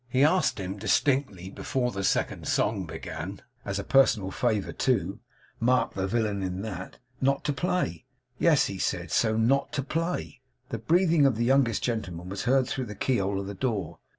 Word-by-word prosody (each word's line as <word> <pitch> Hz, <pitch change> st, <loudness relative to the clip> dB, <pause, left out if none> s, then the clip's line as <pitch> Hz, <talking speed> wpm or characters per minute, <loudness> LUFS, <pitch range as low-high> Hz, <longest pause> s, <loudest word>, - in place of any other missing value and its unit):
He 130 Hz, +2 st, +3 dB
asked 170 Hz, -, +3 dB
him 95 Hz, +1 st, -5 dB
distinctly, 105 Hz, -, +1 dB
before 125 Hz, +2 st, -1 dB
the 95 Hz, 0 st, -4 dB
second -, -, 0 dB
song 100 Hz, -4 st, 0 dB
began 95 Hz, +5 st, -6 dB, 0.2 s
as 100 Hz, -1 st, -3 dB
a 100 Hz, -, -2 dB
personal 110 Hz, -8 st, +3 dB
favour 110 Hz, -3 st, 0 dB
too, 110 Hz, -5 st, 0 dB, 0.4 s
mark 125 Hz, +2 st, +2 dB
the 95 Hz, -1 st, -2 dB
villain 105 Hz, -2 st, 0 dB
in 95 Hz, +1 st, -3 dB
that 95 Hz, -4 st, -6 dB, 0.2 s
not 135 Hz, +1 st, +2 dB
to 145 Hz, -, 0 dB
play. 135 Hz, -, -1 dB, 0.3 s
Yes; 160 Hz, -4 st, +4 dB
he 95 Hz, -1 st, -5 dB
said -, -, -2 dB
so; 110 Hz, 0 st, +2 dB
not 125 Hz, +5 st, +2 dB
to 140 Hz, -, -1 dB
play. 165 Hz, -3 st, -3 dB, 0.3 s
The 115 Hz, -, -3 dB
breathing 165 Hz, -, +4 dB
of 130 Hz, -, +1 dB
the 115 Hz, +2 st, 0 dB
youngest 130 Hz, -4 st, +3 dB
gentleman 90 Hz, -7 st, -3 dB
was 100 Hz, +1 st, -4 dB
heard 130 Hz, +1 st, +3 dB
through 130 Hz, -1 st, -2 dB
the 105 Hz, -, -7 dB
key 130 Hz, +5 st, +1 dB
hole 100 Hz, 0 st, -1 dB
of 100 Hz, -, -4 dB
the 100 Hz, -, -5 dB
door. 100 Hz, -6 st, -2 dB
115 Hz, 185 wpm, -27 LUFS, 95-135 Hz, 0.4 s, Yes